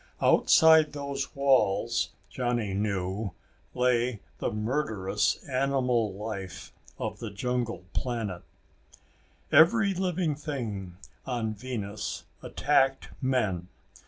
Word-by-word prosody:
Outside 160 -1 +6
those 140 -1 -4
walls, 120 -5 +2 0.2
Johnny 120 -5 -1
knew, 100 -1 -2 0.4
lay 125 -2 +2 0.2
the - - 0
murderous 105 -3 -1
animal 125 -6 +1
life 100 -3 -6 0.2
of - - -4
the - - -5
jungle 120 0 -2
planet. 115 -8 -2 1.1
Every 195 +6 +6
living 180 -3 0
thing 115 - -5 0.3
on 115 -4 -1
Venus 105 -3 -5 0.2
attacked 135 -2 +1
men. 105 -10 0
120 Hz, 90 wpm, -28 LUFS, 105-140 Hz, 1.1 s, Outside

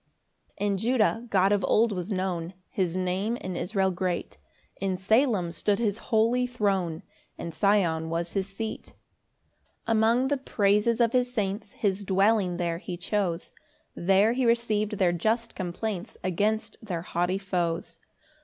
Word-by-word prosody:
1 205 - -1
In 200 -1 +1
Judah 230 0 +1
God 195 -1 +3
of 205 -2 +2
old 225 +1 +3
was 185 +1 -4
known; 185 -2 -2 0.2
His 180 -3 -1
Name 185 +5 0
in 185 -4 -5
Israel 190 +1 0
great; 180 -1 -3 0.4
In 190 -1 -1
Salem 210 -2 +2
stood 200 +4 0
his 215 -1 0
holy 235 +2 +3
throne, 195 -9 -1 0.3
And 170 - -6
Sion 175 -6 +2
was 170 +1 -2
his 195 -1 -1
seat. 215 +3 -6 0.9
2 230 - -1
Among 230 +4 +3
the 285 - +1
praises 210 -2 +2
of 230 -1 +3
his 250 -1 +2
saints 205 -2 -2
His 200 -1 -1
dwelling 195 -1 +2
there 170 -1 -1
he 175 -1 -6
chose; 180 -2 -2 0.4
There 195 +5 +3
he 260 +1 0
receiv'd 230 -3 +1
their 180 -3 +3
just 225 +6 0
complaints 190 +3 -4
Against 205 +5 0
their 175 -6 -4
haughty 175 +1 0
foes. 175 -4 -2
200 Hz, 150 wpm, -27 LUFS, 180-220 Hz, 0.9 s, God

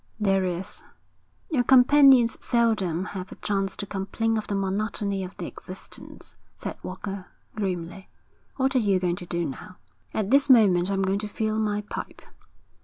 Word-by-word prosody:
'There 195 -2 +2
is.' 180 +1 -4 0.7
'Your 260 -6 +2
companions 260 -1 +6
seldom 210 -8 +1
have 190 -1 -6
a - - -8
chance 195 -2 -2
to 205 - -4
complain 205 +3 -2
of 215 - -3
the 200 - -2
monotony 200 0 -2
of 185 - -9
their - - -5
existence,' 185 0 -11 0.2
said - - -5
Walker, 190 +1 -6 0.3
grimly. 190 -2 -4 0.5
'What 265 0 0
are - - +5
you 200 -5 +2
going 180 -1 -1
to 175 - -9
do 170 -1 -2
now?' 150 +6 -8 0.3
'At 215 0 -2
this 280 +1 +4
moment 195 -7 +5
I'm 195 -1 0
going 190 +1 0
to 210 - -4
fill 215 +1 -2
my 210 -1 0
pipe.' 210 - -8
200 Hz, 165 wpm, -25 LUFS, 190-225 Hz, 0.7 s, companions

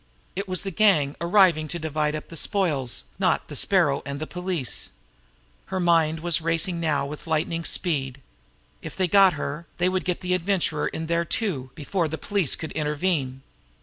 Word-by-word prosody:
It 195 +2 -3
was 185 -1 0
the 195 - -3
gang 165 -7 +3
arriving 170 -3 +4
to 170 - -3
divide 155 -1 -1
up 155 - -7
the 165 - -8
spoils, 150 - 0 0.2
not - - +1
the - - -6
Sparrow 170 -8 +3
and 140 0 -5
the 155 - -3
police. 180 - -2 0.7
Her 190 - -2
mind 165 -3 +3
was 170 -1 +1
racing 165 +2 -1
now 155 -4 0
with 150 +3 -8
lightning 165 +1 0
speed. 140 -7 0 0.6
If - - -8
they 185 -1 +1
got 195 0 +6
her, 150 +2 -5
they 180 +1 +2
would 185 0 -1
get 180 -1 -2
the 180 0 0
Adventurer 175 -4 0
in 160 - -4
there, 170 +1 +1
too, 165 - -2
before 170 +3 -1
the 160 +1 -4
police 200 -6 +1
could 160 - -6
intervene. 150 -3 -1
165 Hz, 180 wpm, -25 LUFS, 150-180 Hz, 0.7 s, got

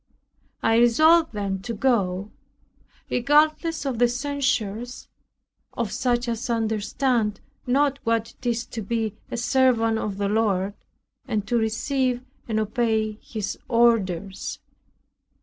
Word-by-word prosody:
I 225 - +4
resolved 315 +8 +5
then 200 -2 -2
to 230 +3 -5
go, 205 -5 0 0.8
regardless 305 +5 +2
of 255 -4 -2
the 245 - +5
censures 250 -3 -2 0.7
of - - -2
such 245 -1 0
as 235 +2 -3
understand 225 0 0 0.3
not 280 +2 +2
what 230 -1 0
it - - -19
is 235 0 0
to 225 - -6
be 220 0 -2 0.2
a - - -4
servant 235 -3 +2
of 200 -3 -3
the 200 0 0
Lord, 200 -2 +1 0.5
and 210 -2 -1
to 240 - -1
receive 245 +3 0 0.2
and 220 -2 0
obey 220 0 0
His 215 -3 -5
orders. 205 -6 +1
230 Hz, 120 wpm, -24 LUFS, 215-250 Hz, 0.8 s, resolved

